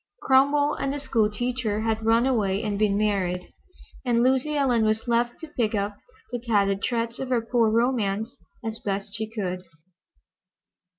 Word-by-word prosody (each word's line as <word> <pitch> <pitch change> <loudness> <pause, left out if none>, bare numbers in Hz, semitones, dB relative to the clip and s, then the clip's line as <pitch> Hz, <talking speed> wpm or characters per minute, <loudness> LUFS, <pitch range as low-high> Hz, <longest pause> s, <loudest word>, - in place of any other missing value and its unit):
Cromwell 285 +2 +4
and 275 - -2
the 290 - -3
school 225 -6 +1
teacher 225 -1 -2
had 220 0 -1
run 230 +2 +3
away 210 -6 +1
and 205 -2 -2
been 205 -2 +2
married, 190 -4 -1 0.5
and 240 -2 +2
Lucy 265 +4 +2
Ellen 250 -5 +2
was 220 +2 0
left 240 0 +1
to 320 - -6
pick 220 -3 +1
up 205 0 -1 0.4
the 245 - -2
tattered 200 -4 +1
shreds 235 -1 -1
of 265 - -4
her 250 -2 +2
poor 230 -1 +2
romance 225 -2 0 0.3
as 225 0 -4
best 195 0 -3
she 220 0 -3
could. 185 -5 -3
225 Hz, 165 wpm, -25 LUFS, 210-245 Hz, 0.5 s, Cromwell